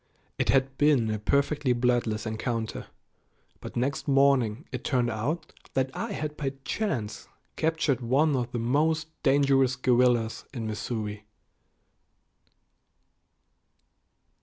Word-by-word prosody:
It - - 0
had 135 0 +2
been 140 -7 +3
a 110 - -2
perfectly 140 +3 +1
bloodless 120 -3 0
encounter, 110 0 -3 0.7
but - - -9
next 135 +5 -1
morning 135 -3 +3
it - - -5
turned 125 -3 +1
out 125 +10 -3 0.2
that 130 0 +1
I 225 -1 -3
had 150 -4 -4
by 140 -2 -3
chance 140 - -3 0.3
captured 160 -5 0
one 140 +5 +2
of 120 -2 -2
the - - -3
most 155 +7 +1
dangerous 135 -2 +3
guerrillas 125 -3 +2
in 115 -3 -3
Missouri. 105 -1 -4
130 Hz, 110 wpm, -27 LUFS, 115-140 Hz, 0.7 s, been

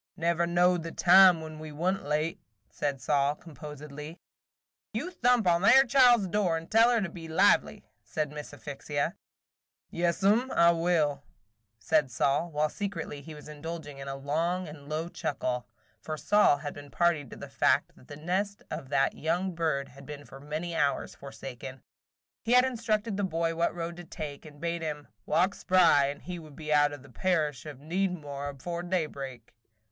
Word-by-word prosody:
"Never 170 +1 +1
knowed 175 0 +3
the 165 +1 -6
time 180 -1 +7
when 155 -1 -8
we 155 0 -8
wa' 170 +5 0
n't 195 - -4
late," 155 +3 -1 0.3
said 140 -2 -2
Sol, 140 +2 +1
composedly. 150 0 -9 0.8
"You 300 +12 -3
thump 245 - +2
on 170 -1 +3
that 200 +6 +7
'ere 265 - +8
child's 245 -4 +5
door, 185 -3 +1
and 165 0 -9
tell 225 +2 +6
her 235 -2 +2
to 190 - -1
be 165 -1 -9
lively," 160 - +3 0.2
said 150 -2 -3
Miss 150 0 -8
Asphyxia. 145 0 -3 0.8
"Yaas 170 +2 0
'm 225 +6 +3
I 170 0 +6
will," 165 -4 +1 0.6
said 150 +5 +1
Sol, 140 +7 +1
while 150 -1 +1
secretly 165 -5 -5
he 155 +2 -10
was 150 - -12
indulging 150 -1 -7
in 135 - -7
a 135 - -4
long 165 +6 -1
and 145 -2 -11
low 155 +2 -2
chuckle, 125 -7 -3 0.3
for 155 -1 -5
Sol 205 -4 +4
had 145 0 -6
been 145 0 -11
party 170 -1 +2
to 130 - -11
the - - -9
fact - - +1
that - - -19
the 145 - -9
nest 190 +6 -2
of 155 -4 -5
that 135 -1 +2
young 175 +4 -1
bird 155 -5 -1
had 140 +1 -14
been 145 -1 -8
for 135 - -12
many 155 +4 -4
hours 145 -3 0
forsaken. 135 -1 -9 0.6
He 230 - 0
had 250 +1 +7
instructed 225 -4 -1
the 205 - -1
boy 165 -2 0
what 170 +1 0
road 170 0 -5
to 175 - -8
take, 150 -3 -7
and 145 -1 -14
bade 170 +1 -2
him 150 -2 -5 0.2
"walk 180 +5 +2
spry 170 -9 +4
and 140 +1 -6
he 175 0 -6
would 155 -3 -13
be 155 -1 -2
out 145 0 +4
of 145 -3 -9
the 140 - -16
parish 155 -2 0
of 145 -3 -8
Needmore 150 -3 -3
afore 170 +5 -5
daybreak. 140 -9 -4
160 Hz, 185 wpm, -29 LUFS, 145-180 Hz, 0.8 s, ere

